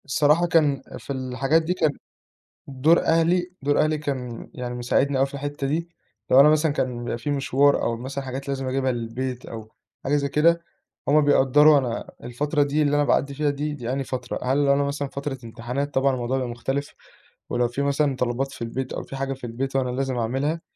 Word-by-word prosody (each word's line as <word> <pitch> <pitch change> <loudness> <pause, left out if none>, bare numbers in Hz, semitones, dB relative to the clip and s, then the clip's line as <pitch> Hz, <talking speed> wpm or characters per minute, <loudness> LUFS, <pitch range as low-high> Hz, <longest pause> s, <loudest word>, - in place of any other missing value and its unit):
الصراحة 150 +4 +3
كان، 150 -5 +2 0.2
في 140 - -6
الحاجات 130 +4 +1
دي 165 +3 -1
كان 160 -5 +1 0.8
دور 145 +5 +3
أهلي 175 +2 +2
دور 145 +1 +1
أهلي 155 0 +2
كان 130 -6 -5
يعني 125 -1 -5
مساعدني 130 +3 +1
أوي 135 - +3
في 135 - -10
الحتّة 145 0 -4
دي، 165 +4 -2 0.4
لو 130 - +7
أنا 145 +2 +8
مثلًا 155 0 +3
كان 125 -4 -2
بيبقى 120 - -3
في 125 +5 -3
مشوار 140 0 +2
أو 115 0 -1
مثلًا 135 +3 -5
حاجات 135 +1 -6
لازم 135 -1 -2
اجيبها 130 0 0
للبيت 125 +2 -4
أو 110 -1 -9 0.3
حاجة 140 +2 +1
زي 140 -1 0
كده، 170 +4 +3 0.5
هُم 150 +2 +5
بيقدّروا 145 +1 +5
أنا 125 -4 -2
الفترة 145 +5 0
دي 145 +2 0
اللي 145 -1 +2
أنا 145 - +3
باعدّي 140 -1 +1
فيها 150 +1 0
دي، 145 +1 -2
دي 125 -4 -4
أنهي 135 0 -1
فترة، 125 -1 -4
هل 140 +3 +2
أنا 140 +1 +3
مثلًا 140 0 -2
فترة 140 0 -5
امتحانات 125 +5 -4
طبعًا 135 0 +2
الموضوع 125 +1 -1
بيبقى 130 -2 -2
مختلف، 135 +4 -3 0.5
ولو 120 0 +1
في 120 +4 -4
مثلًا 140 0 +1
طلبات 125 +2 -1
في - - -12
البيت 125 +3 -4
أو - - -4
في - - -9
حاجة 135 0 -2
في 135 - -14
البيت 135 +4 -4
وأنا 130 -2 +1
لازم 130 0 -2
اعملها، 135 +8 -1
135 Hz, 200 wpm, -24 LUFS, 125-145 Hz, 0.8 s, أنا